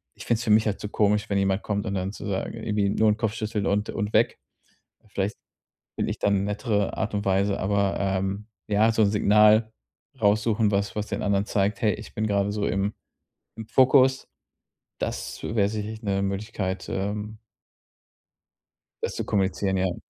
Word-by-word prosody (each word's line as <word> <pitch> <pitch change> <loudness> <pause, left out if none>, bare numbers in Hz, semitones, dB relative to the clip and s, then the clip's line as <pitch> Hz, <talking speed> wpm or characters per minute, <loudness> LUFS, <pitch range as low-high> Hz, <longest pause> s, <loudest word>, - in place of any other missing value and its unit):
ich - - -10
finde 115 - +2
es 115 - -5
für 110 - +2
mich 110 +1 +5
halt 105 - -1
zu 105 - -5
komisch, 105 0 +1
wenn 100 - +1
jemand 95 +1 +1
kommt 100 -1 -2
und 100 - -2
dann 95 +1 -2
zu - - -8
sagen 95 -1 -2
irgendwie 105 -2 +1
nur 110 +2 +3
'n 105 - +1
Kopf 110 -2 -1
schüttele 110 -2 -2
und 105 +1 0
und 105 -1 -3
weg. 110 +2 +2 0.7
Vielleicht 100 +1 -2 0.6
finde - - -1
ich - - -6
da - - +2
'ne 100 -1 +2
nettere 105 0 -1
Art 110 +1 -2
und 100 0 -2
Weise, 100 +1 +1
aber, 100 0 +1
ähm, 95 +1 -1 0.2
ja, 105 +2 +3
so 110 - +2
'n 100 - +3
Signal 105 +1 +4 0.5
raussuchen, 105 +1 +2
was 100 0 -1
was 105 0 -3
den - - -3
anderen 100 -1 +1
zeigt: 100 0 0
„Hey, 105 -2 +3
ich - - -11
bin 110 - -1
grade 100 -1 +1
so 105 -1 -1
im 100 +2 0 0.6
im 110 -1 -7
Fokus.“ 130 +2 +4 0.7
Das - - -4
wär 105 -3 +1
sicherlich 110 +1 -5
'ne 100 -2 0
Möglichkeit, 100 -1 -3
ähm 105 +2 -3 1.6
das - - -2
zu - - -3
kommunizieren, 95 -1 0
ja. 95 -1 0
105 Hz, 185 wpm, -25 LUFS, 100-110 Hz, 1.6 s, mich